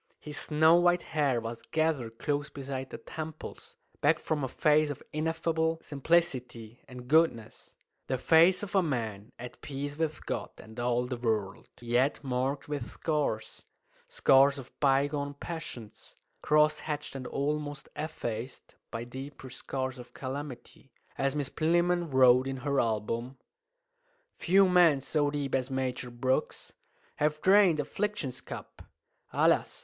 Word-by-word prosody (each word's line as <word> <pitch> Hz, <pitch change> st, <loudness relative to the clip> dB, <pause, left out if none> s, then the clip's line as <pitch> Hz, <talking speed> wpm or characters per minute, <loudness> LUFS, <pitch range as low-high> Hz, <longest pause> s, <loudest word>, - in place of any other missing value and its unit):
His 150 Hz, -1 st, -8 dB
snow 160 Hz, +2 st, +4 dB
white 175 Hz, 0 st, +3 dB
hair 140 Hz, -6 st, +2 dB
was 115 Hz, 0 st, -6 dB
gathered 150 Hz, -8 st, -1 dB
close 145 Hz, +2 st, -1 dB
beside 135 Hz, -1 st, -5 dB
the -, -, -7 dB
temples, 155 Hz, 0 st, -8 dB, 0.3 s
back 155 Hz, +2 st, +4 dB
from 155 Hz, -2 st, -2 dB
a -, -, 0 dB
face 150 Hz, +3 st, +3 dB
of 145 Hz, -, -6 dB
ineffable 160 Hz, +1 st, 0 dB
simplicity 130 Hz, -7 st, -1 dB
and 125 Hz, -1 st, -10 dB
goodness 150 Hz, -7 st, +1 dB, 0.3 s
the 130 Hz, -, 0 dB
face 170 Hz, +8 st, +5 dB
of 205 Hz, -, -6 dB
a 195 Hz, -, +5 dB
man 115 Hz, -, -3 dB
at 125 Hz, 0 st, -9 dB
peace 145 Hz, +1 st, -5 dB
with 155 Hz, -2 st, -2 dB
God -, -, -3 dB
and 110 Hz, +2 st, -11 dB
all 120 Hz, 0 st, +1 dB
the 125 Hz, 0 st, -4 dB
world, 110 Hz, -5 st, -2 dB
yet 120 Hz, +4 st, +1 dB
marked 135 Hz, +2 st, -1 dB
with 145 Hz, -5 st, -4 dB
scars 145 Hz, -9 st, -2 dB, 0.4 s
scars 140 Hz, -, +4 dB
of 130 Hz, -2 st, -9 dB
bygone 140 Hz, +1 st, +1 dB
passions, 140 Hz, -9 st, -8 dB, 0.3 s
cross 150 Hz, 0 st, +3 dB
hatched 150 Hz, -1 st, -4 dB
and 130 Hz, -2 st, -6 dB
almost 145 Hz, 0 st, -3 dB
effaced 125 Hz, -6 st, -5 dB, 0.2 s
by 115 Hz, -, -4 dB
deeper 130 Hz, +1 st, -9 dB
scars 130 Hz, +1 st, -4 dB
of 125 Hz, -, -12 dB
calamity. 135 Hz, 0 st, -7 dB, 0.2 s
As 135 Hz, +1 st, 0 dB
Miss 145 Hz, -3 st, -2 dB
Plinlimmon 175 Hz, +1 st, +1 dB
wrote 130 Hz, 0 st, +6 dB
in 135 Hz, 0 st, -3 dB
her 140 Hz, -1 st, +2 dB
album 115 Hz, +3 st, -1 dB, 1.0 s
"Few 195 Hz, +2 st, +4 dB
men 175 Hz, -6 st, +5 dB
so 145 Hz, +2 st, 0 dB
deep 145 Hz, -2 st, -3 dB
as 130 Hz, 0 st, 0 dB
Major 130 Hz, -1 st, -2 dB
Brooks 130 Hz, +2 st, -2 dB, 0.4 s
Have 150 Hz, +1 st, +1 dB
drained 190 Hz, -2 st, +5 dB
affliction's 180 Hz, -2 st, -2 dB
cup. -, -, -9 dB, 0.5 s
Alas! -, -, +2 dB
140 Hz, 140 wpm, -30 LUFS, 125-155 Hz, 1.0 s, wrote